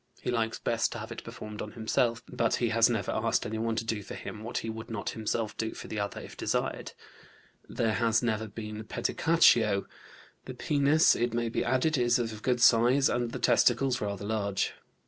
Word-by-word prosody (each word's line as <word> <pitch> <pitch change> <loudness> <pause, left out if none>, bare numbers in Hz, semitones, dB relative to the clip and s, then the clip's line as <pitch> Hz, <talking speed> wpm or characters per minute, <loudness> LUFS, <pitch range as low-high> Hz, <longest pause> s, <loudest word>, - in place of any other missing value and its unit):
He - - -3
likes 115 -2 -1
best 115 -1 0
to - - -6
have 110 0 -7
it 115 - -7
performed 110 -2 -8
on 105 - -7
himself, 115 +1 0
but 115 -1 0
he 120 - 0
has 115 +1 +4
never 110 -5 -1
asked - - 0
anyone 110 +1 -2
to 115 - -2
do 110 -2 -2
for 100 - -8
him 110 - -8
what 115 - -4
he - - -4
would 110 +1 -6
not 115 -3 -3
himself 110 0 -3
do 110 0 -3
for - - -8
the 110 - -4
other 100 0 -3
if - - -10
desired. - - -2 0.8
There 115 -2 0
has 115 0 +2
never 110 -2 -1
been 105 +1 -7
pedicatio. 115 -9 +3 0.6
The - - -7
penis, 145 +2 +3
it 120 -1 -1
may 120 -1 0
be - - -1
added, 130 +4 +1
is 120 -1 +3
of 115 -3 -4
good 125 0 0
size, 125 +4 +5
and 120 -1 -1
the - - -4
testicles 125 +1 +3
rather 100 -1 -3
large. 100 -2 -1
115 Hz, 200 wpm, -29 LUFS, 110-120 Hz, 0.8 s, size